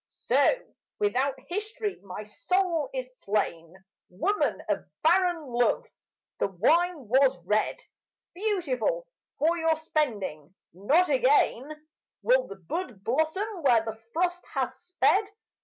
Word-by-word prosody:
So, - - +2 0.4
without 275 -10 +1
history, 420 +2 -3
my 200 +1 -7
soul 330 - 0
is 255 -1 -6
slain 170 -5 -2 0.3
Woman 380 - 0
of - - 0 0.2
barren 350 0 +3
love; 245 - +1 0.5
the - - +2
wine 300 - +2
was 260 0 +4
red 210 +3 +1 0.6
Beautiful 400 - -1 0.3
for 335 +3 +2
your 325 0 +3
spending. 205 - -2 0.2
Not 285 - +3
again 285 +2 +2 0.4
Will - - +3
the - - -8
bud 250 - -5
blossom 315 - 0
where 240 -6 +4
the 225 0 -6
frost 355 +3 0
has 260 -1 0
sped. 365 +6 +1
300 Hz, 115 wpm, -27 LUFS, 235-360 Hz, 0.6 s, was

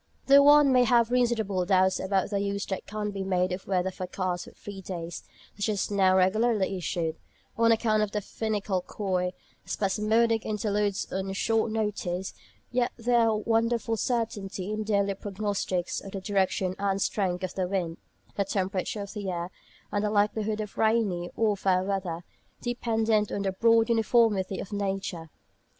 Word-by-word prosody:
Though 280 +1 +8
one 290 -1 +7
may 250 -1 +5
have 235 0 +3
reasonable 225 -7 +1
doubts 190 0 +3
about 195 +1 0
the 200 - 0
use 200 0 -2
that 190 - -5
can 210 0 -3
be 195 -1 -4
made 185 -1 +1
of 180 +1 -5
weather 185 -1 0
forecasts 185 -1 -3
for - - -11
three 200 -2 -9
days, 175 -2 -6 0.3
such 205 +2 -1
as 205 -1 -1
are - - -1
now 190 -1 +4
regularly 195 +1 +2
issued, 165 -3 -2 0.4
on 230 0 +4
account 220 -1 +2
of 210 - +1
the 210 - -1
finical, 205 -2 -2
coy, 180 -2 -2 0.3
spasmodic 220 +3 +1
interludes 210 -1 -1
on 190 +1 -2
short 225 +3 +1
notice, 205 -4 -2 0.4
yet 245 0 +1
there 240 0 +3
is - - +3
a 220 - +2
wonderful 230 +1 +1
certainty 210 -5 -2
in 215 - -2
the 215 - -3
daily 200 -2 +1
prognostics 195 -2 -2
of 195 - -10
the 195 - -3
direction 190 -1 0
and 195 -1 0
strength 190 -2 -1
of 185 - -3
the 185 -2 -1
wind, 175 -3 -2 0.4
the 200 - +1
temperature 195 +1 -2
of 200 - -7
the 205 -3 -4
air, 175 0 -3 0.4
and 205 0 0
the 210 - +1
likelihood 210 +1 +1
of 210 -2 -7
rainy 215 -6 +1
or 215 -2 +2
fair 185 -2 +1
weather, 185 -3 -3 0.4
dependent 225 -3 0
on 200 - -2
the 195 - 0
broad 230 +3 +4
uniformity 225 -4 +2
of 200 - -6
nature. 195 -5 -3
200 Hz, 170 wpm, -27 LUFS, 190-220 Hz, 0.4 s, Though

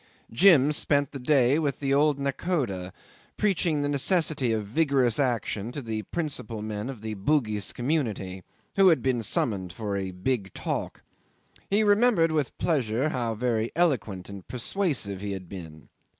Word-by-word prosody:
Jim 150 +1 +6
spent 145 -1 +1
the 140 - -6
day 135 +1 +3
with 145 -4 -1
the 135 -1 0
old 145 0 +3
nakhoda, 135 - -2 0.5
preaching 175 -7 +1
the - - 0
necessity 145 -3 +1
of 110 -2 -1
vigorous 130 -1 +2
action 115 -4 -1
to 145 - -5
the 110 -4 -4
principal 115 -7 -4
men 105 +2 -4
of 125 -6 -7
the 110 0 -4
Bugis 105 -2 0
community, 115 - -2 0.4
who 195 -1 +6
had 165 -4 +4
been 130 -3 +1
summoned 100 -4 -1
for 100 +2 -4
a 95 -1 -2
big 95 +2 -2
talk. - - -4 0.7
He 205 +2 +3
remembered 205 -5 +4
with 150 -4 -1
pleasure 135 -3 0
how 120 -5 -2
very 115 -1 -1
eloquent 110 - 0
and 100 -2 -10
persuasive 120 - -2
he 100 -1 -3
had 95 -2 -7
been. 80 -5 -10
125 Hz, 155 wpm, -27 LUFS, 105-150 Hz, 0.7 s, Jim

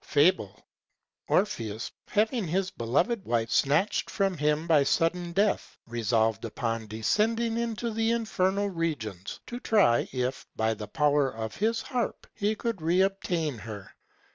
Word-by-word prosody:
FABLE.—Orpheus 115 - -1 0.2
having 220 -1 +1
his 185 +3 0
beloved 145 - 0
wife 115 -1 0
snatched 150 +9 +2
from 195 -2 0
him 150 +1 +1
by 155 -4 +4
sudden 170 +4 +1
death, 200 +3 0
resolved 115 -2 +1
upon 115 0 -3
descending 225 - 0
to 235 +2 -3
the 225 +1 0
infernal 205 -4 +1
regions, 145 - -3
to 240 - -6
try 200 - +3
if, 125 0 -2
by 110 0 +1
the 105 -1 -7
power 145 0 +2
of 110 -2 -5
his 225 +2 +1
harp, 245 -3 -3
he 210 +1 0
could 230 0 -2
reobtain 175 - 0
her. 105 -3 -8
165 Hz, 130 wpm, -28 LUFS, -, 0.2 s, by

